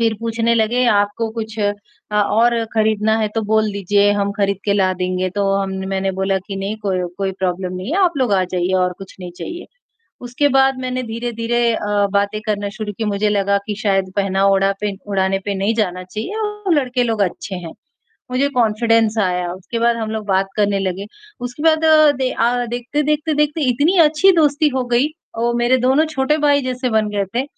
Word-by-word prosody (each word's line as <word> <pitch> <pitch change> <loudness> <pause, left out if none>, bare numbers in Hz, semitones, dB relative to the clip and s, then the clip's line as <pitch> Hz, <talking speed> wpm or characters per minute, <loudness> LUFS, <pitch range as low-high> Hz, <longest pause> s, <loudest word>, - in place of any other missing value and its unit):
फ़िर 225 -1 +2
पूछने 230 0 0
लगे 235 +3 +2
आपको 205 +2 0
कुछ 220 -1 -6
अ 205 0 +1 0.5
और 230 +3 +2
ख़रीदना 220 0 +2
है 215 -1 0
तो 225 - +1
बोल 220 -1 +3
दीजिए, 200 +1 +2
हम 200 0 0
ख़रीद 200 -2 0
के 200 - +3
ला 190 -2 +2
देंगे, 185 0 -1
तो 195 0 0
हम 195 -1 -1 0.2
मैंने 195 0 -1
बोला 190 0 +1
कि 195 - -5
नहीं, 195 +2 -3
कोई 190 -3 -1 0.2
कोई 195 -1 -1
प्रॉब्लम 185 0 -2
नहीं 185 - -5
है, 385 - +1
आप 345 - +2
लोग 250 -5 +1
आ 185 - +2
जाइए 180 0 -2
और 180 - -1
कुछ 195 -1 -11
नहीं 180 -1 -7
चाहिए। 345 +1 -7 0.6
उसके 250 +4 0
बाद 270 -1 +3
मैंने 255 0 -3
धीरे-धीरे 230 +1 -2 0.2
अ, 205 -1 0
बातें 200 +1 0
करना 205 -1 -1
शुरू 215 -1 -5
की, 225 - -1
मुझे 210 0 0
लगा 200 -1 +1
कि 210 - -2
शायद 195 -2 +2
पहना 195 -1 +1
ओढ़ा 195 0 +3
पे 210 -1 -1 0.2
ओढ़ाना 190 -1 +1
पे 200 - -1
नहीं 200 +4 0
जाना 185 -3 -2
चाहिए 215 - -6
और 420 -4 -1
लड़के 255 -4 +1
लोग 225 -3 -1
अच्छे 190 +1 -3
हैं, 170 -2 -8 0.6
मुझे 275 +3 +1
कॉन्फिडेंस 225 0 +2
आया, 180 -3 0
उसके 190 +6 -6
बाद 235 0 +3
हम 220 -1 -3
लोग 220 -1 -4
बात 195 0 +1
करने 200 -1 +2
लगे। 195 +1 -3 0.4
उसके 250 +5 -9
बाद 320 0 +3 0.3
दे 260 -1 0
आ, 245 +1 0
देखते-देखते 295 +6 -1
देखते 300 +1 0
इतनी 290 +10 +2
अच्छी 320 +6 +4
दोस्ती 300 0 +3
हो 260 - 0
गई 255 +5 +3 0.3
और 235 +1 0
मेरे 240 +2 +3
दोनों 285 +5 +4
छोटे 270 +2 +1
भाई 285 -1 +4
जैसे 255 0 -2
बन 220 -2 +1
गए 200 - 0
थे 255 - +1
215 Hz, 200 wpm, -19 LUFS, 195-245 Hz, 0.6 s, अच्छी